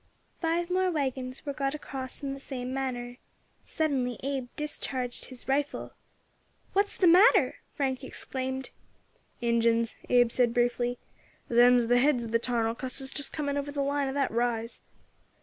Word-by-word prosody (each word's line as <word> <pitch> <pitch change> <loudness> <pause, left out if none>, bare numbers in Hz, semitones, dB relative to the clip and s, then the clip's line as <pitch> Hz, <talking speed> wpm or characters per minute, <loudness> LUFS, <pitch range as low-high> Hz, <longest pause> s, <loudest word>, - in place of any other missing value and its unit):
Five 340 +1 0
more 370 0 +2
waggons 265 -5 -3
were 285 - -2
got 275 +1 -1
across 265 -3 -7
in 275 -1 -2
the 275 - -7
same 255 -2 -5
manner. 245 -2 -3 0.5
Suddenly 265 -6 -1
Abe 270 -2 -2
discharged 260 -4 -2
his 255 -2 -10
rifle. 280 +2 -1 0.8
"What's 400 +1 +1
the 370 - +3
matter?" 365 +8 +6 0.2
Frank 265 -1 -1
exclaimed. 260 0 -5 0.7
"Injins," 230 -1 +2
Abe 245 -1 +5
said 240 -2 +2
briefly. 245 0 +1 0.5
"Them's 245 0 +6
the 245 +1 +4
heads 260 -2 +3
of 225 - -6
the 230 - +3
tarnal 230 -2 0
cusses 260 +2 -2
just 285 - -2
coming 285 -2 -2
over 285 0 -3
the 285 -1 -1
line 280 0 0
of 265 - -3
that 280 -2 +1
rise." 230 0 -1
260 Hz, 150 wpm, -29 LUFS, 245-285 Hz, 0.8 s, matter